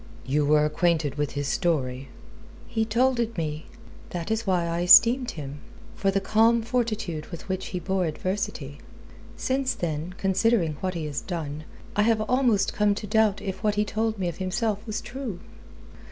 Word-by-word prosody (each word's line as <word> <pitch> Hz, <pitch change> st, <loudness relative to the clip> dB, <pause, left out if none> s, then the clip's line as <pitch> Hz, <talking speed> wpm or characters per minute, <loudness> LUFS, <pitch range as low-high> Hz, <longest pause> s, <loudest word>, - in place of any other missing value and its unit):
"You 145 Hz, +2 st, +1 dB
were 150 Hz, 0 st, +4 dB
acquainted 155 Hz, -2 st, +1 dB
with 145 Hz, -1 st, -2 dB
his 145 Hz, -1 st, -2 dB
story?" 135 Hz, -7 st, -1 dB, 0.6 s
"He 225 Hz, -2 st, 0 dB
told 245 Hz, +3 st, +2 dB
it 230 Hz, -2 st, -1 dB
me. 155 Hz, -1 st, -3 dB, 0.4 s
That 175 Hz, +4 st, -4 dB
is 220 Hz, 0 st, -1 dB
why 180 Hz, -3 st, +2 dB
I 170 Hz, 0 st, -1 dB
esteemed 235 Hz, +8 st, +7 dB
him 145 Hz, -1 st, -6 dB, 0.3 s
for 195 Hz, -, 0 dB
the 195 Hz, 0 st, +2 dB
calm 225 Hz, +4 st, +3 dB
fortitude 220 Hz, -10 st, -2 dB
with 170 Hz, -, -9 dB
which 190 Hz, 0 st, -3 dB
he 180 Hz, -, -4 dB
bore 185 Hz, +1 st, 0 dB
adversity. 155 Hz, -4 st, -3 dB, 0.6 s
Since 260 Hz, -1 st, 0 dB
then, 165 Hz, +1 st, -3 dB
considering 190 Hz, -3 st, +2 dB
what 185 Hz, -1 st, -2 dB
he 165 Hz, -2 st, -3 dB
has 145 Hz, -2 st, -3 dB
done, 155 Hz, -4 st, -5 dB, 0.3 s
I 210 Hz, -, +3 dB
have 220 Hz, 0 st, +3 dB
almost 240 Hz, -2 st, +2 dB
come 210 Hz, -1 st, +2 dB
to 210 Hz, -, -5 dB
doubt 215 Hz, -1 st, +2 dB
if 190 Hz, -2 st, -4 dB
what 210 Hz, -1 st, +2 dB
he 210 Hz, 0 st, +1 dB
told 220 Hz, +1 st, -1 dB
me 185 Hz, -2 st, -1 dB
of 170 Hz, -, -4 dB
himself 200 Hz, +3 st, -1 dB
was 215 Hz, 0 st, -3 dB
true." 245 Hz, -6 st, -6 dB
190 Hz, 175 wpm, -26 LUFS, 160-220 Hz, 0.6 s, esteemed